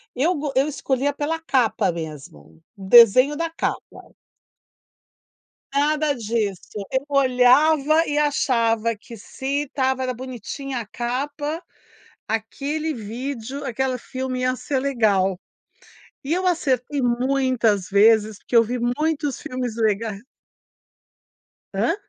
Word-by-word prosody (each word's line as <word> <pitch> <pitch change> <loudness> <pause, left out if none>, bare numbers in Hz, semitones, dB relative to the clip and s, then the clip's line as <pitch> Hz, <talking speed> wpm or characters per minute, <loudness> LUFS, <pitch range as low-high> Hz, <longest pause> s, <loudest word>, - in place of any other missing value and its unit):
eu 315 +8 +2
go 295 -1 -3
eu 270 +2 +3
escolhia 280 -1 -1
pela 305 +3 -2
capa 235 - +1
mesmo, 135 - -9 0.2
o 195 - -9
desenho 245 +6 +7
da 330 0 -1
capa. 330 - -5 1.6
Nada 300 +1 +2
disso, 210 -3 -3
eu 265 +1 0
olhava 280 +4 +4
e 295 - -2
achava 230 -6 +1
que 225 +2 -12
se 270 +6 -3
estava 265 -2 -1
era 255 0 -2
bonitinha 255 +2 -6
a 230 - -6
capa, 290 - -4 0.7
aquele 280 +8 -2
vídeo, 250 +3 -6
aquele 260 0 -1
filme 255 +1 -5
ia 255 0 +1
ser 270 +1 -2
legal. 205 -9 +1 0.8
E 280 - -2
eu 370 +2 0
acertei 285 -5 0
muitas 245 -5 +1
vezes 210 +1 +4
porque 240 - -2
eu 230 - +7
vi 245 +3 -3
muitos 290 +3 -1
filmes 250 -3 -4
lega 215 -2 0 1.6
Hã? 230 - +1
255 Hz, 115 wpm, -22 LUFS, 225-285 Hz, 1.6 s, desenho